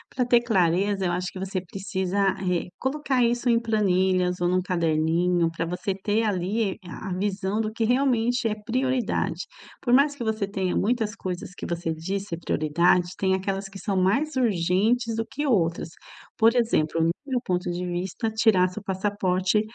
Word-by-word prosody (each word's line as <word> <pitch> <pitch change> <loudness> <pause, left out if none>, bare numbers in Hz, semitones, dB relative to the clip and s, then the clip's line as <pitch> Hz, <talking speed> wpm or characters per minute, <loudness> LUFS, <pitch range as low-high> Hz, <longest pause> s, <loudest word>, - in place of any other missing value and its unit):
pra 255 - +2
ter 240 -1 +5
clareza, 195 -2 +1
eu 175 - +1
acho 180 +1 -2
que - - -11
você 190 0 -2
precisa 195 +1 -1
re 180 -2 -2
colocar 265 -1 0
isso 240 +1 +1
em 230 -1 +4
planilhas 185 -5 +1
ou 175 - +1
num 185 +1 +2
caderninho, 170 0 +1
pra 165 0 -3
você 180 +3 -2
ter, 205 +3 0
ali, 200 +1 0
eh, - - -19
a 190 +3 -6
visão 195 +2 -1
do 215 - 0
que 230 - -1
realmente 245 -1 +2
é 210 - -1
prioridade, 225 -5 -1 0.4
por 245 - +1
mais 285 +2 +4
que 240 - -5
você 220 -2 -1
tenha 190 -2 -2
muitas 220 0 0
coisas 180 -4 -5
que - - -6
você 170 -1 -2
diz 190 +5 -4
ser 165 - -3
prioridade, 170 +3 +2
tem 190 -1 +1
aquelas 195 +1 -3
que 195 - -11
são 195 -3 -2
mais 265 +12 +1
urgentes 225 +2 +1
do 225 - -1
que 290 +3 -3
outras, 170 -9 +1 0.5
por 225 +2 +4
exemplo, 165 -9 +1
no 165 - +3 0.2
meu 255 -3 -1
ponto 180 -2 -1
de 180 +1 -3
vista, 180 +5 -2
tirar 215 -5 +3
seu 200 +3 -8
passaporte 190 0 0
195 Hz, 180 wpm, -25 LUFS, 180-225 Hz, 0.5 s, ter